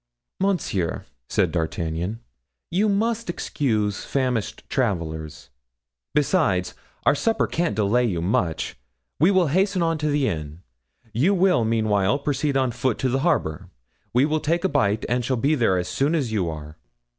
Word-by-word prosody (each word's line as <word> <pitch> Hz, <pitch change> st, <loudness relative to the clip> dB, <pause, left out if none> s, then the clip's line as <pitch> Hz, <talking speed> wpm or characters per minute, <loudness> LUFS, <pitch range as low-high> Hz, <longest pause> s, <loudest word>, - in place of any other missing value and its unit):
"Monsieur," 180 Hz, -, -1 dB, 0.2 s
said -, -, +1 dB
D'Artagnan, 85 Hz, +4 st, -2 dB, 0.5 s
"you 200 Hz, +5 st, +2 dB
must 225 Hz, +1 st, 0 dB
excuse 110 Hz, -, -1 dB
famished 125 Hz, -5 st, -1 dB
travelers. 80 Hz, -, -2 dB, 0.6 s
Besides, 140 Hz, -, +2 dB, 0.3 s
our -, -, +6 dB
supper 225 Hz, +10 st, +1 dB
can't 170 Hz, -9 st, -1 dB
delay 110 Hz, +4 st, +2 dB
you 95 Hz, -7 st, -1 dB
much. 85 Hz, -2 st, -1 dB, 0.4 s
We 165 Hz, -, +5 dB
will 185 Hz, -5 st, +3 dB
hasten 190 Hz, +3 st, +2 dB
on 165 Hz, -1 st, 0 dB
to 150 Hz, -, -1 dB
the 145 Hz, -2 st, +1 dB
inn; 80 Hz, +1 st, -5 dB, 0.5 s
you 155 Hz, -, +3 dB
will 180 Hz, -8 st, +3 dB
meanwhile 110 Hz, -2 st, +2 dB
proceed 145 Hz, 0 st, 0 dB
on 130 Hz, -2 st, +1 dB
foot 125 Hz, 0 st, -1 dB
to 130 Hz, -, 0 dB
the 130 Hz, +2 st, +1 dB
harbor. 95 Hz, -, 0 dB, 0.4 s
We 125 Hz, +3 st, +4 dB
will 155 Hz, +1 st, +1 dB
take 170 Hz, +3 st, 0 dB
a 190 Hz, -, +2 dB
bite 105 Hz, -, +1 dB
and 125 Hz, +1 st, 0 dB
shall 130 Hz, +2 st, 0 dB
be 140 Hz, +7 st, +2 dB
there 115 Hz, -10 st, +2 dB
as 90 Hz, 0 st, -2 dB
soon 140 Hz, -, +1 dB
as 135 Hz, -8 st, -1 dB
you 95 Hz, -6 st, 0 dB
are." 75 Hz, 0 st, -8 dB
125 Hz, 155 wpm, -24 LUFS, 95-155 Hz, 0.6 s, our